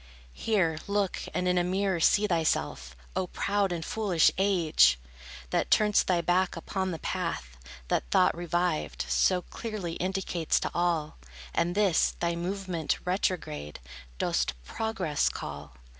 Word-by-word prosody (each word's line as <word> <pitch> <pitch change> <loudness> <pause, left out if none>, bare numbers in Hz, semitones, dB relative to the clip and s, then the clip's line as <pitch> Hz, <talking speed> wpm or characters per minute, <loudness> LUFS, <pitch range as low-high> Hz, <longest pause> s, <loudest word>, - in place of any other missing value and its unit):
Here 185 -8 +1
look, 200 -2 0
and 180 - -1
in 180 0 +3
a - - +2
mirror 190 0 0
see 205 +5 +4
thyself, 160 - -1 0.2
O 185 - 0
proud 200 +1 0
and 165 -2 -3
foolish 195 -7 +3
age! 165 - +4 0.5
That - - +1
turn'st 210 -1 +4
thy 180 -2 +2
back 175 +1 +1
upon 190 +3 -2
the 165 - -3
path, 165 - -3 0.3
That - - -1
thought 180 - +4
revived 175 -1 -1
So 180 -1 +2
clearly 210 -7 -5
indicates 185 -3 0
to - - -2
all, 170 - 0 0.3
And 170 +1 0
this, 200 -5 +3
thy 170 0 0
movement 180 -2 -2
retrograde, 165 - -2 0.4
Dost - - 0
Progress 185 - -1
call. 75 -2 -7
175 Hz, 135 wpm, -28 LUFS, 160-195 Hz, 0.5 s, see